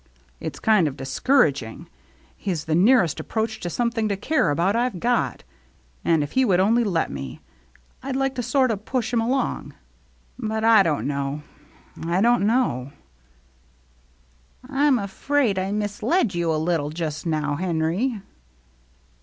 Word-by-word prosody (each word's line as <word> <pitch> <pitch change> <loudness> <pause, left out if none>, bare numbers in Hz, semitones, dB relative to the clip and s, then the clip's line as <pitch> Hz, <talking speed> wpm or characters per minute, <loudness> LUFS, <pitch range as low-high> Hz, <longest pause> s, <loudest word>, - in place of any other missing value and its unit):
It's - - -6
kind 215 -7 +3
of 140 -1 -5
discourag 140 - +2
ing. 115 +9 -10 0.5
He's 175 -7 -3
the 160 - -1
nearest 185 - +4
approach 220 0 -3
to 175 - -4
some 235 +6 0
thing 225 -2 -1
to 200 - -1
care 260 - +1
about 170 +8 +1
I've 240 -5 0
got, 240 +3 0 0.6
and 160 -3 +2
if 145 - -6
he 260 - +2
would 190 -7 +3
only 225 +5 +3
let 180 -7 0
me, 65 -2 -7 0.6
I'd 265 0 -4
like 270 0 0
to 255 - -3
sort 255 +1 +2
o' 215 - -1
push 240 +3 -3
him 230 - +3
along. 255 +4 -2 0.6
But 220 -2 -2
I 225 -2 +7
don't 160 -6 0
know 140 +1 -3 0.3
— - - -15
I 170 +2 0
don't 235 -1 +3
know." 145 - 0 0.9
" - - -36
I'm 280 0 +3
afraid 215 +1 0
I 190 +1 -2
misled 210 - 0
you 170 -1 0
a - - +1
little 155 -2 0
just 155 -1 -4
now, 150 -2 -1
Henry." 185 - -1
195 Hz, 160 wpm, -23 LUFS, 155-240 Hz, 0.9 s, I